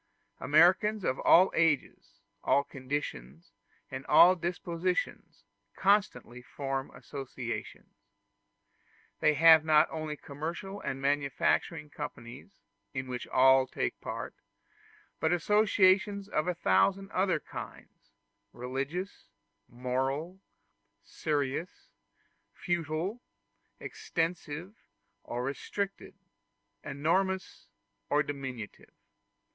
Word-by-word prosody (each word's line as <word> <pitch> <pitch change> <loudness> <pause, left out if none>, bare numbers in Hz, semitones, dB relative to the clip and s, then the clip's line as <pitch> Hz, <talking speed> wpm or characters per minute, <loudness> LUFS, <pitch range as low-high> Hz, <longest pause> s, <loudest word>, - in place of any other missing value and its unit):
Americans 185 +8 +4
of 130 - -1
all 185 +3 +6
ages, 140 -10 0 0.2
all 140 - +3
conditions, 100 - -6 0.4
and 130 0 -5
all 175 +4 +7
dispositions, 175 +1 -3 0.3
constantly 190 - +1
form 135 +1 -4
associations. 130 -2 -7 1.3
They 155 -1 +3
have 160 +1 +7
not 155 0 +5
only 155 -1 -4
commercial 170 +9 -6
and 135 -1 -4
manufacturing 145 +2 0
companies, 120 -7 -8 0.4
in 130 0 -2
which 125 -1 -5
all 130 0 +5
take - - -3
part, - - -5 0.9
but 160 - +1
associations 200 +1 +3
of 155 -5 -1
a 180 - 0
thousand 185 - +2
other 185 -3 +1
kinds 100 -7 -10 0.4
religious, 135 +10 -5 0.4
moral, 135 +9 -3 0.6
serious, 155 - -3 0.7
futile, 175 +5 -2 0.6
extensive, 165 +2 -4 0.5
or 120 +1 -4
restricted, 195 +11 -4 0.7
enormous 185 +7 -1 0.4
or 150 +1 +3
diminutive. 130 -7 -7
150 Hz, 85 wpm, -30 LUFS, 130-180 Hz, 1.3 s, all